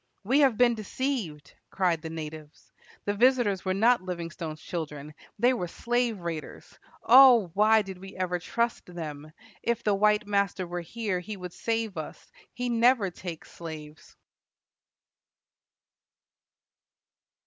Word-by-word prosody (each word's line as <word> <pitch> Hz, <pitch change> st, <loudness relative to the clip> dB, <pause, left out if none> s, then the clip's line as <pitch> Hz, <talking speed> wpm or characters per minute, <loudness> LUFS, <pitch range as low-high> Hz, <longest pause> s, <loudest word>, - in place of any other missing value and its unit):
"We 260 Hz, +8 st, +3 dB
have 265 Hz, -7 st, +4 dB
been 245 Hz, -1 st, +5 dB
deceived," 215 Hz, -, -4 dB, 0.2 s
cried 180 Hz, -4 st, 0 dB
the 160 Hz, -, -6 dB
natives. 155 Hz, -1 st, -9 dB, 0.3 s
"The 205 Hz, -, 0 dB
visitors 235 Hz, -4 st, +3 dB
were 185 Hz, -1 st, 0 dB
not 235 Hz, +3 st, +4 dB
Livingstone's 170 Hz, -3 st, -6 dB
children. 150 Hz, -4 st, -6 dB, 0.2 s
They 245 Hz, +4 st, +4 dB
were 180 Hz, -8 st, -3 dB
slave 235 Hz, +1 st, -1 dB
raiders. 165 Hz, -2 st, -7 dB, 0.2 s
O! 245 Hz, -7 st, +7 dB
why 215 Hz, +2 st, +4 dB
did 190 Hz, -2 st, -9 dB
we 195 Hz, +1 st, -11 dB
ever 180 Hz, -1 st, -1 dB
trust 235 Hz, +6 st, -2 dB
them? 155 Hz, -4 st, -7 dB, 0.3 s
If 235 Hz, -1 st, -1 dB
the 210 Hz, -, +2 dB
white 210 Hz, +1 st, +3 dB
master 200 Hz, -2 st, 0 dB
were 175 Hz, 0 st, -4 dB
here, 195 Hz, +1 st, -3 dB
he 200 Hz, +4 st, -7 dB
would 180 Hz, -1 st, -8 dB
save 225 Hz, -3 st, -2 dB
us. -, -, -8 dB, 0.2 s
He 250 Hz, 0 st, -4 dB
never 235 Hz, -4 st, +3 dB
takes 175 Hz, -2 st, -8 dB
slaves." 155 Hz, -2 st, -10 dB
195 Hz, 130 wpm, -27 LUFS, 170-230 Hz, 0.3 s, O